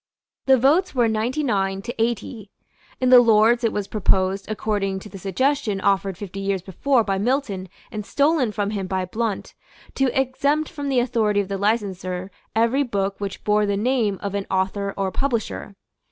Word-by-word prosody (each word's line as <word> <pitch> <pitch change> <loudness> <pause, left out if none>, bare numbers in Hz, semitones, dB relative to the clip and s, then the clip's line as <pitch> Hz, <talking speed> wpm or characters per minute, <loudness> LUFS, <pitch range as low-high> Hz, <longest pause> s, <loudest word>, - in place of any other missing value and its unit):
The 265 0 +6
votes 300 +8 +3
were 240 -2 +3
ninety 230 +7 -1
nine 195 -6 0
to 240 0 -4
eighty. 230 -2 -2 0.5
In 255 0 +2
the 250 - +10
Lords 230 +1 +4
it 230 - +2
was 205 -1 -3
proposed, 195 -1 +1
according 205 -2 -1
to 210 - -10
the 195 - -10
suggestion 210 +3 0
offered 195 -1 +1
fifty 195 -1 -7
years 195 -2 -1
before 235 +7 +1
by 195 -2 -1
Milton 205 -5 -1 0.2
and 210 -1 -4
stolen 280 0 +2
from 205 -1 -2
him 195 -3 -3
by 185 0 -1
Blount, 215 +2 -3 0.4
to 270 -1 +2
exempt 280 +4 0
from 290 -4 -4
the 265 - +1
authority 225 -4 +1
of 200 -1 -2
the 195 -1 -3
licenser 190 -3 -1 0.2
every 230 +5 +3
book 200 -6 -2
which 200 -1 -5
bore 210 0 +2
the 200 0 0
name 225 -3 +1
of 200 -1 -3
an 200 -1 -3
author 195 +1 -1
or 195 -1 -1
publisher. 235 -5 -2
210 Hz, 180 wpm, -23 LUFS, 195-245 Hz, 0.5 s, the